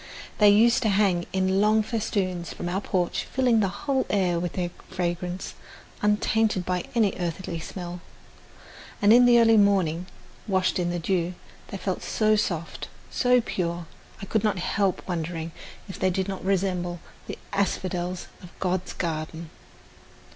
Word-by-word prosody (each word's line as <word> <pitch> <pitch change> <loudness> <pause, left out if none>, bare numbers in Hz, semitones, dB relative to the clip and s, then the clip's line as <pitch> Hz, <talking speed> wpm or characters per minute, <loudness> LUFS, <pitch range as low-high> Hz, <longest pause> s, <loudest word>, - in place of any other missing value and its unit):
They 210 -1 +7
used 230 +5 +5
to 220 - +2
hang 190 -4 +2
in 190 +1 +1
long 215 +1 +4
festoons 195 -6 -2
from 175 - -5
our 185 +3 -1
porch, 180 -3 -1
filling 250 -3 +2
the 200 - +2
whole 265 +7 -1
air 180 -4 +1
with 175 -1 -3
their 175 -2 -2 0.2
fragrance, 180 0 -3 0.5
untainted 210 -2 +2
by 180 -1 -1
any 215 -4 +3
earthy 175 0 -3
smell; 175 +1 -7 1.0
and 205 +1 +6
in 245 +1 +7
the 240 -1 +7
early 225 -1 +6
morning, 185 -4 +2 0.4
washed 190 -2 +1
in 175 -1 0
the 175 - -1
dew, 175 0 -1 0.3
they 195 - -6
felt 190 -1 -3
so 215 -1 +2
soft, 170 -6 -2 0.2
so 250 0 +3
pure, 175 -5 -3 0.3
I - - -6
could 220 +2 0
not 210 -3 +1
help 190 +1 -1
wondering 165 -2 -3 0.4
if 190 - -8
they 190 - +2
did 190 +1 -1
not 195 -1 -5
resemble 180 -2 0 0.3
the - - -5 0.2
asphodels 185 -2 -1 0.2
of 180 - -11
God's 185 0 -1
garden. 160 -1 -4
185 Hz, 155 wpm, -26 LUFS, 175-210 Hz, 1.0 s, They